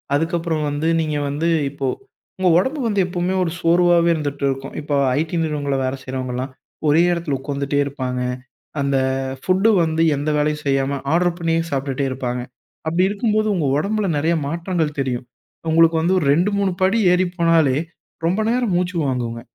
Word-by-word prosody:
அதுக்கப்பறம் 165 -1 -1
வந்து 145 +3 -2
நீங்க 155 -2 -1
வந்து 150 +4 -1 0.2
இப்போ 140 -2 -3 0.5
உங்க 185 -1 +3
உடம்பு 265 +10 -1
வந்து 205 -2 0
எப்பவுமே 180 0 -1
ஒரு 165 - -2
சோர்வாவே 170 0 +4
இருந்துட்ருக்கும். 140 -2 -3
இப்போ 145 0 -2 0.2
ஐடி 160 +2 -2
நிறுவனங்கள்ல 145 -3 -1
வேல 130 +1 -2
செய்றவங்கள்லாம், 130 0 -4 0.4
ஒரே 150 +3 +5
எடத்ல 165 -5 -2
உக்காந்துட்டேருப்பாங்க. 140 -2 -2 0.6
அந்த 140 0 +1 0.4
ஃபுட்டு 190 +4 +2
வந்து, 160 0 0 0.2
எந்த 145 +2 -2
வேலையும் 150 0 0
செய்யாம 135 0 +1 0.2
ஆர்டர் 175 0 +2
பண்ணியே 165 -1 +1
சாப்டுட்டே 135 0 -1
இருப்பாங்க. 125 -1 -3 0.5
அப்டி 170 +3 +2
இருக்கும்போது 215 +1 0
உங்க 160 -5 0
ஒடம்பில 210 +6 0
நெறைய 160 +4 +1
மாற்றங்கள் 165 -1 -2
தெரியும். 130 -2 -2 0.4
உங்களுக்கு 165 +1 +5
வந்து 180 +3 +2
ஒரு 155 - -2
2 175 +7 +2
3 195 -1 +1
படி 190 +4 +3 0.2
ஏறி 180 +1 +2
போனாலே 165 -5 +3 0.5
ரொம்ப 185 +6 +1
நேரம் 240 -4 +1
மூச்சு 180 +1 -1
வாங்குங்க. 120 -3 -2
160 Hz, 150 wpm, -20 LUFS, 140-175 Hz, 0.6 s, ஒரே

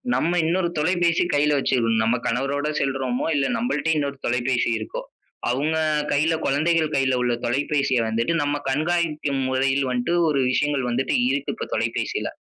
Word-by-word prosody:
நம்ம 170 - +1
இன்னொரு 175 +1 +1
தொலைபேசி 175 +1 +2
கையில 145 0 +3
வச்சுகனும். 115 -4 +1
நம்ம 115 +3 +2
கணவரோடு 140 +5 -1
செல்றோமோ, 130 -2 -1
இல்ல 140 - +1
நம்மள்டயே 160 - 0
இன்னொரு 140 -1 -2
தொலைபேசி 120 0 0
இருக்கோ? 110 - -5 0.5
அவங்க 150 +6 0 0.3
கையில 155 +3 +2
குழந்தைகள் 155 +2 +1
கையில 135 -2 +2
உள்ள 120 -1 +1
தொலைபேசிய 135 +1 0
வந்துட்டு, 115 +8 0
நம்ப 145 0 -1
கண்காணிக்கும் 150 -2 0
முறையில் 135 +1 +1
வந்துட்டு 125 +7 -1
ஒரு 140 -3 +1
விஷயங்கள் 140 -2 0
வந்துட்டு 130 +3 0
இருக்கு 140 +1 -1
இப்போ - - -5
தொலைபேசியில. - - -2
140 Hz, 145 wpm, -23 LUFS, 130-155 Hz, 0.5 s, கையில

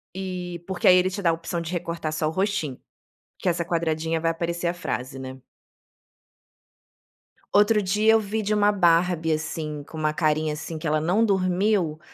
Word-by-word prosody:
eh, 180 -2 -5
porque 190 - 0
aí 180 - +9
ele 180 +1 +3
te 200 +2 -5
dá 170 - +3
a - - +3
opção 165 +1 -4
de 165 +1 -5
recortar 170 -2 -3
só 155 0 0
o - - -1
rostinho, 185 -7 -1 0.6
que - - -4
essa 170 0 0
quadradinha 165 -1 -1
vai 165 0 +1
aparecer 170 +1 -2
a 170 - 0
frase, 135 -6 -4
né. 130 0 -8 2.1
Outro 210 +1 +4
dia 210 +3 +3
eu 225 - +5
vi 215 +1 -2
de 210 0 0
uma 205 0 +4
Barbie, 170 -3 +2
assim, 155 -1 -4
com 160 - -11
uma 155 -1 0
carinha, 155 -1 +1
assim, 160 +2 -6
que 160 - -4
ela 155 0 +1
não 190 +8 +2
dormiu, 185 -4 +1
170 Hz, 185 wpm, -24 LUFS, 155-190 Hz, 2.1 s, aí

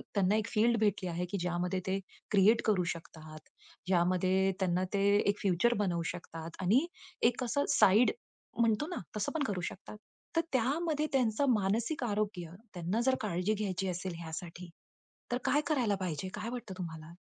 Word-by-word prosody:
त्यांना 200 0 +3
एक 215 -1 0
फील्ड 230 +1 +3
भेटली 205 -4 +1
आहे 175 +1 -2
की 200 - -1
ज्यामध्ये 180 +1 -1
ते 190 +1 0 0.3
क्रिएट 210 +3 +5
करू 205 -5 +3
शकतात. 155 -2 -11 0.5
ज्यामध्ये 185 +1 +3
त्यांना 185 -1 +1
ते 200 -1 +2
एक 205 0 +1
फ्युचर 200 +5 +3
बनवू 175 -3 0
शकतात 165 -1 -8
आणि 220 - +4 0.4
एक 245 - -6
कसं 260 +4 0
साइड 210 +6 +5 0.5
म्हणतो 230 +4 +2
ना, 355 - -5 0.2
तसं 205 - -1
पण 320 -3 0
करू 190 -4 -2
शकतात. 200 +3 -7 0.4
तर 330 - +4
त्यामध्ये 300 +5 +1
त्यांचं 250 0 +2
मानसिक 225 +8 0
आरोग्य 205 -6 -2 0.2
त्यांना 180 +4 -1
जर 265 0 +4
काळजी 185 0 0
घ्यायची 195 -3 -2
असेल 180 +1 -3
ह्यासाठी, 170 +1 -7 0.6
तर 245 - +2
काय 295 - +3
करायला 245 -10 +2
पाहिजे? 185 -3 -3
काय 230 - -4
वाटतं 240 -5 -6
तुम्हाला? 160 -2 -7
195 Hz, 160 wpm, -32 LUFS, 180-230 Hz, 0.6 s, क्रिएट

